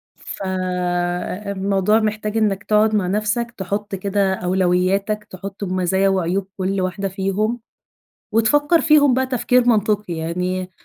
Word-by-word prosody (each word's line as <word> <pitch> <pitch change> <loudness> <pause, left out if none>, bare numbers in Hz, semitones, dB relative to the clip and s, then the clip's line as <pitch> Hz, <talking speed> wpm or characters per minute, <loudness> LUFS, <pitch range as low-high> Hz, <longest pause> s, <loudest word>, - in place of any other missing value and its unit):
فالموضوع 185 +2 -1
محتاج 215 0 -2
إنّك 205 -2 +1
تقعُد 215 +1 +3
مع 195 -4 +1
نَفْسك، 215 +4 -1
تحُط 200 +2 -3
كده 195 0 0
أولوياتك، 190 +3 0
تحُط 195 +2 -8
ب 185 -2 -3
مزايا 190 +1 +2
وعيوب 190 0 0
كل 190 0 -1
واحدة 185 +2 -2
فيهم، 195 +5 -1 0.7
وتفكّر 290 +9 +3
فيهم 295 -4 +5
بقى 260 +1 +1
تفكير 250 -1 +2
منطقي، 210 -4 +1
يعني 180 +3 -3
195 Hz, 120 wpm, -20 LUFS, 185-215 Hz, 0.7 s, فيهم